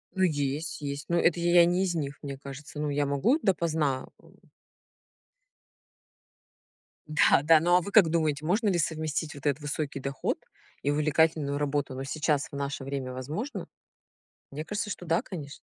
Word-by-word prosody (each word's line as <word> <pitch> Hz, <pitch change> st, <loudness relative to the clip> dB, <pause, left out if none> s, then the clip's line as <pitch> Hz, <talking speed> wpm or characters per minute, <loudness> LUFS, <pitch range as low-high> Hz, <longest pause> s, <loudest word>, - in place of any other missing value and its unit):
Ну 190 Hz, -, +2 dB
есть, 145 Hz, -2 st, -1 dB
есть. 140 Hz, 0 st, -4 dB
Но 170 Hz, -, +2 dB
это 170 Hz, 0 st, +3 dB
я 175 Hz, 0 st, +6 dB
не 180 Hz, +2 st, +2 dB
из 185 Hz, -2 st, 0 dB
них, 145 Hz, -3 st, -3 dB
мне 140 Hz, -2 st, -5 dB
кажется. 140 Hz, +2 st, -9 dB
Ну 150 Hz, 0 st, -1 dB
я 145 Hz, 0 st, +1 dB
могу 140 Hz, -, +2 dB
допоздна, 160 Hz, -, 0 dB
эм. -, -, -20 dB, 2.7 s
Да, 155 Hz, -2 st, +4 dB
да. 160 Hz, +1 st, +7 dB
Ну, 175 Hz, +3 st, +3 dB
а 180 Hz, -, +5 dB
вы 200 Hz, -, -6 dB
как 195 Hz, -5 st, +6 dB
думаете, 155 Hz, -3 st, 0 dB
можно 210 Hz, +7 st, +1 dB
ли 185 Hz, -, +1 dB
совместить 155 Hz, -1 st, -1 dB
вот 145 Hz, -1 st, -12 dB
этот 145 Hz, 0 st, +1 dB
высокий 145 Hz, -1 st, -3 dB
доход 135 Hz, 0 st, -2 dB, 0.5 s
и 145 Hz, -, +2 dB
увлекательную 150 Hz, -1 st, +2 dB
работу? 145 Hz, -2 st, -1 dB
Но 135 Hz, -, -4 dB
сейчас, 150 Hz, +1 st, 0 dB
в -, -, -8 dB
наше 140 Hz, 0 st, -3 dB
время 135 Hz, -2 st, -4 dB
возможно? 170 Hz, -, -5 dB, 0.8 s
Мне 150 Hz, +3 st, -5 dB
кажется, 210 Hz, +2 st, -3 dB
что, 185 Hz, -, -6 dB
да, 165 Hz, 0 st, +2 dB
конечно. 145 Hz, -6 st, -8 dB
150 Hz, 170 wpm, -28 LUFS, 140-170 Hz, 2.7 s, да